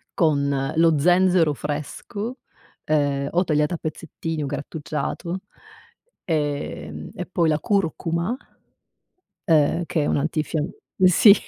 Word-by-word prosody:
con 140 -4 +1
lo 165 -1 +4
zenzero 180 -1 +4
fresco. 155 - -5 0.5
Eh, 140 -2 +2
o 175 +2 +3
tagliato 150 0 +1
a - - -4
pezzettini 160 0 -4
o - - -2
grattugiato, 155 +5 -4 0.8
ehm, 145 -3 -3
e 180 - -4
poi 175 -2 +1
la 155 -1 +2
curcuma 170 +2 0 1.1
eh, 160 +1 +4
che 160 - 0
è - - 0
un - - +1
antifiam 155 +1 -1 0.3
sì. 185 +3 +8
160 Hz, 115 wpm, -23 LUFS, 145-175 Hz, 1.1 s, sì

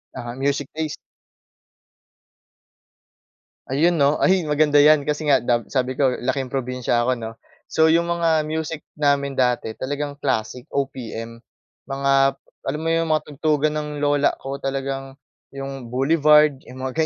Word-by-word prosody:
Uh-huh, 120 0 -6
music 140 +1 -1
taste. 155 -1 -3 2.7
Ayun 155 +7 +3
'no, 145 -2 +3
ay, 190 0 +3
maganda 150 -1 +4
'yan 150 -1 +5
kasi 150 0 -1
nga 135 - +6
dab 120 -1 -1
sabi 130 -1 0
ko 135 0 +2
laking 130 0 -2
probinsiya 125 -2 -1
ako 130 - +2
'no. 115 -2 -6 0.4
So, 160 0 +4
'yong 170 +1 +2
mga 165 -2 +2
music 160 0 -3 0.2
namin 140 -2 +1
dati 125 -3 0
talagang 145 +1 -4
classic 125 -2 -2
OPM. 115 -4 -4 0.5
Mga, 140 0 -1 0.5
alam 150 +3 -2
mo 165 - -3
'yong 165 0 +1
mga 155 - +1
tugtugan 150 +1 0
ng 150 0 -3
lola 145 0 +2
ko 135 +1 -5
talagang 135 0 -4 0.4
'yong 135 -3 -7
Boulevard 150 +1 +4
yung 130 +1 -10
mga 130 +5 0
140 Hz, 140 wpm, -22 LUFS, 130-150 Hz, 2.7 s, nga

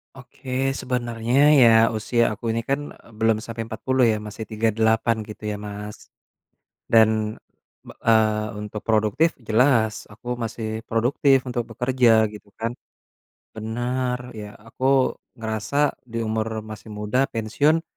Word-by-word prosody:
Oke 130 +1 -3
sebenernya 120 -1 -2 0.2
ya 120 - +8 0.3
usia 115 +2 +1
aku 110 +2 -7
ini 115 - -1
kan, 140 +1 +2 0.2
e - - -20
belum 110 -1 +3
sampe 115 0 -8
40 130 +3 0
ya 110 - 0
masih 110 +2 -7
38 110 +1 +1
gitu 105 0 -10
ya - - -3
Mas. 105 0 -8 0.8
Dan, 110 -1 +3 0.5
be - - -11
eee, 110 -1 +3
untuk 105 0 -6
produktif 110 +9 +2
jelas 110 -2 +3
aku 115 +3 -14 0.2
masih 110 0 -4 0.2
produktif 130 +3 +2
untuk 120 -1 -2
bekerja 125 -1 +2 0.2
gitu 105 0 -12
kan, 115 +1 -1 0.8
benar 125 +3 -2 0.2
ya 105 0 -8
aku 130 +3 +2 0.2
ngerasa 115 +6 0
di 115 0 -4
umur 110 0 -1 0.2
masih 110 +1 -9
muda 110 +6 +1
pensiun. 145 +9 +2
115 Hz, 130 wpm, -23 LUFS, 110-125 Hz, 0.8 s, ya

